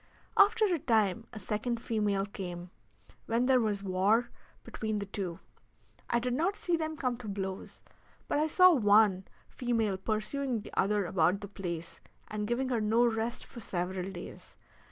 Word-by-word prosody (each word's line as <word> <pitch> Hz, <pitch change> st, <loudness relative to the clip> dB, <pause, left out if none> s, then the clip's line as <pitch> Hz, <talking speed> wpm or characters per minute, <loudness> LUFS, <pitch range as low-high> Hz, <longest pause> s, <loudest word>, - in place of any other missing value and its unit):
After 430 Hz, +2 st, +5 dB
a 355 Hz, -5 st, +1 dB
time 225 Hz, -3 st, +1 dB
a 220 Hz, -, -8 dB
second 215 Hz, +4 st, -2 dB
female 210 Hz, -4 st, 0 dB
came, 180 Hz, -3 st, -7 dB, 0.6 s
when 230 Hz, +2 st, +1 dB
there 260 Hz, -1 st, +5 dB
was 210 Hz, -3 st, -1 dB
war 200 Hz, +5 st, +2 dB, 0.3 s
between 220 Hz, -1 st, -3 dB
the 200 Hz, -, -3 dB
two. 190 Hz, -4 st, -4 dB, 0.7 s
I 235 Hz, -, +2 dB
did 245 Hz, +1 st, -1 dB
not 340 Hz, +10 st, +1 dB
see 350 Hz, -4 st, 0 dB
them 315 Hz, -1 st, -3 dB
come 255 Hz, -6 st, -1 dB
to 240 Hz, -3 st, -9 dB
blows, 195 Hz, -1 st, -5 dB, 0.4 s
but -, -, +1 dB
I 310 Hz, -, +2 dB
saw 365 Hz, +3 st, +7 dB
one 205 Hz, -, +4 dB, 0.2 s
female 225 Hz, -5 st, -1 dB
pursuing 225 Hz, +4 st, -1 dB
the -, -, -12 dB
other 205 Hz, 0 st, +1 dB
about 175 Hz, +2 st, +2 dB
the 200 Hz, -, -6 dB
place, 170 Hz, -4 st, -6 dB, 0.3 s
and 210 Hz, -1 st, -3 dB
giving 250 Hz, +3 st, 0 dB
her 240 Hz, -3 st, 0 dB
no 225 Hz, +3 st, +3 dB
rest 230 Hz, 0 st, -1 dB
for -, -, -11 dB
several 185 Hz, -1 st, -3 dB
days. 175 Hz, -2 st, -10 dB
215 Hz, 165 wpm, -31 LUFS, 195-245 Hz, 0.7 s, saw